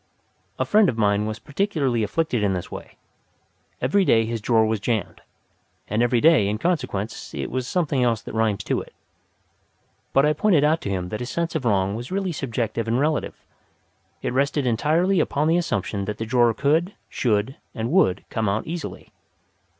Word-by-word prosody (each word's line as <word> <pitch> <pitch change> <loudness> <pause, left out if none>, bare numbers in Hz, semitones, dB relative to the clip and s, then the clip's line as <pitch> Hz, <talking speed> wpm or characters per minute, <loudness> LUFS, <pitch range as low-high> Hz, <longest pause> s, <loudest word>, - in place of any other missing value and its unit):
A - - 0
friend 210 -3 +4
of 115 - -3
mine 105 -1 +2
was 110 0 -4
particularly 140 - -1
afflicted 125 +3 0
in 100 -2 +1
this 90 -2 -5
way. - - -9 0.8
Every 155 +11 +2
day 115 -10 +3
his 115 0 -3
drawer 110 0 +3
was 110 -1 0
jammed, 105 -2 -2 0.7
and 105 +3 0
every 120 0 +3
day 155 -8 +5
in 105 +1 -1
consequence 125 - -3
it 70 -2 -4
was 130 -1 -2
something 150 -7 0
else 115 -3 +2
that - - -8
rhymes 110 -3 0
to - - -1
it. - - -14 1.2
But 135 - +4
I 150 - +3
pointed 165 -2 +3
out 155 +2 +2
to - - -4
him 90 -2 -2
that 105 - -4
this 125 - -5
sense 170 +3 -2
of 155 -6 -2
wrong 100 -3 +2
was 120 +7 -6
really 190 -1 -1
subjective 115 -6 -3
and 115 +2 +1
relative; 150 +1 -1 0.8
it - - -1
rested 140 +1 +1
entirely 160 - +2
upon 150 +2 +1
the 165 +2 +3
assumption 100 - -2
that 105 +1 -4
the 115 - -3
drawer 120 -1 +3
could, 160 +7 +1
should, 110 +2 0 0.2
and 115 +1 -2
would 155 - +2
come 110 -3 0
out 100 +3 -1
easily. 170 +1 -6
120 Hz, 185 wpm, -23 LUFS, 110-155 Hz, 1.2 s, day